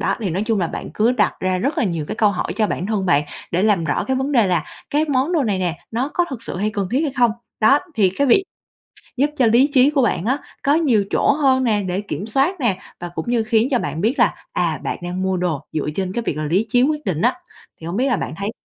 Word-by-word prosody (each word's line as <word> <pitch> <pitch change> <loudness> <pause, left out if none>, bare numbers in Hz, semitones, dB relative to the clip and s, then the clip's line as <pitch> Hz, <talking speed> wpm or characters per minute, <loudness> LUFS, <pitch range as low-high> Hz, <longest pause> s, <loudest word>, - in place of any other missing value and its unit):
Đó, - - +1
thì 195 -5 -2
nói 190 +5 -1
chung 220 -4 +1
là 170 - +1
bạn - - -6
cứ 230 +4 +3
đặt 215 -4 +2
ra 185 0 0
rất 275 +10 -1
là - - +2
nhiều 165 -5 -2
cái - - -3
câu 210 -2 +4
hỏi 180 - -3
cho 215 -2 +2
bản 185 - -3
thân 205 -3 -1
bạn 145 -3 +3 0.3
để 180 +3 +1
làm 200 -6 +2
rõ 145 - 0
cái 265 0 -1
vấn 270 +2 -1
đề 230 -7 +4
là 175 -4 +1 0.3
cái 300 +2 +2
món 275 +3 +1
đồ 320 -5 +2
này 205 -4 0
nè, 175 -3 -2
nó 245 +5 -1
có 350 - +2
thực 235 -4 -6
sự 205 - -6
hay 210 +3 0
cần 200 -3 -3
thiết 265 - +2
hay 290 -4 -1
không? 240 -2 +4 0.3
Đó, 275 +7 +6 0.2
thì 195 -6 +3
cái 280 - +2
việc 380 +10 +4 0.7
giúp 285 +3 +3
cho 255 - +4
lý 245 +6 +4
trí 265 +1 +6
của 290 -3 +1
bạn 205 -6 0
á, 260 +5 +1 0.3
có 285 +1 +3
nhiều 250 -11 +2
chỗ - - +3
hơn 265 -3 +2
nè 215 -4 +2
để 185 +1 -2
kiểm 200 +1 -5
soát 280 - +1
nè, 215 -8 +1 0.2
và 175 0 -5
cũng 160 - -3
như 235 -2 +1
khiến 220 +2 +2
cho 250 - +3
bạn 165 - -3
biết 235 +7 0
là, - - +4 0.2
à, - - 0
bạn - - -2
đang 180 +1 -4
mua 190 -1 0
đồ 170 -5 -1
dựa 155 -1 -2
trên 190 -1 -2
cái 235 - -2
việc 150 - -2
là 155 - -2
lý 185 +9 +1
trí 245 +3 +3
quyết 300 +1 0
định 175 -4 -1
á, 250 +7 +3 0.5
thì 160 - -7
hông 180 +5 -3
biết 260 - +2
là 245 -6 +1
bạn - - -4
thấy 200 +2 -3
220 Hz, 285 wpm, -20 LUFS, 185-260 Hz, 0.7 s, Đó